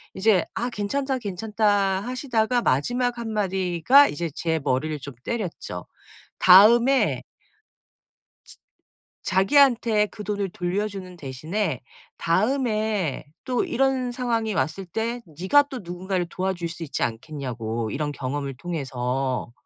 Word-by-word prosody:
이제 190 -2 +3
아 240 +2 -1
괜찮다. 265 +6 -2
괜찮다. 205 -1 0
하시다가 245 -1 0
마지막 245 - 0
한마디가 205 - +3
이제 165 +2 -3
제 160 -1 -1
머리를 150 +3 0
좀 140 0 -8
때렸죠. 215 -8 -4 0.5
다음에 235 +8 +6 1.2
즈 - - -16 0.7
자기한테 225 +1 +4
그 210 - -10
돈을 205 -2 -2
돌려주는 185 0 -4
대신에 155 - -3 0.4
다음에 215 - 0 0.2
또 250 -2 0
이런 260 -1 0
상황이 230 -3 -1
왔을 160 +6 -2
때 230 +7 -3
네가 185 - +3
또 270 -3 -7
누군가를 180 +1 -3
도와줄 185 -2 -2
수 170 0 -7
있지 150 - -3
않겠냐고 115 -3 -4
이런 145 0 -2
경험을 140 0 -4
통해서. 130 -6 -3
190 Hz, 260 characters per minute, -24 LUFS, 155-230 Hz, 1.2 s, 다음에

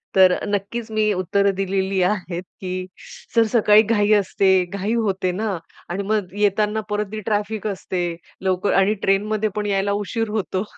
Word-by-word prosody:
तर 185 -1 +6
नक्कीच 205 +3 -3
मी 215 -1 +2
उत्तरं 200 +2 +1
दिलेली 190 0 0
आहेत, 180 -2 -1 0.2
की 185 -1 -4 0.5
"सर, 230 - +6
सकाळी 215 -1 +5
घाई 210 -1 +2
असते, 190 -2 +3
घाई 200 +4 -3
होते 195 -5 0
ना 200 +1 -2 0.3
आणि 190 +3 -2
मग 205 -3 -1
येताना 210 +1 +1
परत 210 0 0
ती 215 - -4
ट्रॅफिक 215 0 -1
असते 190 -2 -3 0.4
लवकर 190 +1 0
आणि 195 +2 +4
ट्रेनमध्ये 210 +2 +1
पण 210 0 -2
यायला 200 0 0
उशीर 225 +2 -2
होतो." 200 -3 -2
200 Hz, 155 wpm, -22 LUFS, 190-215 Hz, 0.5 s, तर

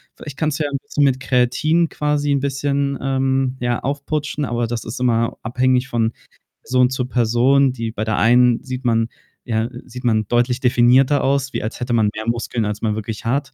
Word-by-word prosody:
Vielleicht 145 -3 -9
kannst 155 -1 -1
du - - +1
ja 145 - -2
'n 140 - -1
bisschen 150 -9 -1
mit 130 -2 +2
Kreatin 135 +6 +1
quasi 150 -1 -1
'n 140 - +2
bisschen, 140 0 -1
ähm, 135 -1 0
ja, 120 -1 -1
aufputschen, 145 +2 -2
aber 120 -1 -1
das 115 0 -4
ist 120 +3 -6
immer 115 -2 +1
abhängig 125 +2 +1
von 115 -2 0 0.5
Person 125 -1 +2
zu 130 -1 -2
Person, 125 +3 +2
die 115 -3 -4
bei 110 -1 -4
der 110 -1 -1
einen 120 +1 +4
sieht 130 0 -6
man 115 -1 +2 0.3
ja, 110 0 -1 0.2
sieht 125 0 -10
man 110 -3 +1
deutlich 120 +1 +1
definierter 130 +3 +4
aus, 135 0 0
wie - - -3
als 110 - -5
hätte 120 -1 -2
man 110 -3 +3
mehr 110 +1 -5
Muskeln, 115 0 -1
als 105 0 -4
man 105 -1 +1
wirklich 110 0 -6
hat., 140 +4 -1
125 Hz, 200 wpm, -20 LUFS, 115-140 Hz, 0.5 s, einen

